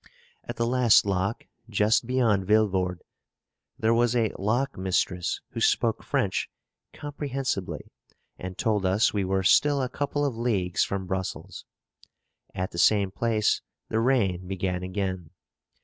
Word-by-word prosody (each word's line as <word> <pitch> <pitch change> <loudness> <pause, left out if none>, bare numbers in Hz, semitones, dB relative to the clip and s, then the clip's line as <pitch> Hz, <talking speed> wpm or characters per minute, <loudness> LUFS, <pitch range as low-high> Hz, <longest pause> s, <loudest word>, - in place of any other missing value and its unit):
At - - -5
the 115 - 0
last 120 -3 +4
lock, 100 +2 -1 0.2
just 110 +2 +2
beyond 115 -7 +1
Villevorde, 95 -4 +1 0.7
there 110 +1 +2
was 120 +1 +2
a 115 -3 +1
lock 120 +8 0
mistress 90 -1 -1
who - - -5
spoke - - +2
French - - -1 0.4
comprehensibly, 135 - -4 0.5
and 95 0 -7
told 105 -3 0
us 95 +3 +2
we 100 -2 0
were 95 0 0
still 145 +8 +4
a 130 - 0
couple 145 +2 -2
of 135 -5 -1
leagues 100 -7 0
from 100 -1 -3
Brussels. 95 0 -5 0.9
At 95 0 -3
the 85 - -5
same 100 0 +4
place, 110 0 +1 0.3
the 110 - 0
rain 100 -8 +1
began 95 -1 -2
again. 95 -3 -3
105 Hz, 135 wpm, -26 LUFS, 95-120 Hz, 0.9 s, last